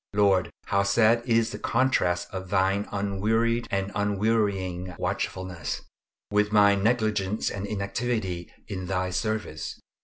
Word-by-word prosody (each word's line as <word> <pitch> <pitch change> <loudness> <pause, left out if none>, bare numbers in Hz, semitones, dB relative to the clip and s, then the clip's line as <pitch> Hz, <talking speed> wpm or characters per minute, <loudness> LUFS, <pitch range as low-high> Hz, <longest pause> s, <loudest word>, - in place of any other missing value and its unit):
Lord, 100 -4 +3 0.2
how 100 - +2
sad 110 +4 +4
is 115 -1 +3
the - - -6
contrast 90 -9 +1
of 95 -1 -5
Thine 95 +1 +2
unwearied 110 +4 0
and 95 0 -1
unwearying 100 -3 0
watchfulness, 95 -3 -3 0.5
with 105 0 +2
my 100 -1 +6
negligence 105 -1 +1
and 100 0 -4
inactivity 100 -3 -2 0.2
in 95 -3 -5
Thy 90 0 -1
service. 110 -5 -3
100 Hz, 120 wpm, -27 LUFS, 95-110 Hz, 0.5 s, my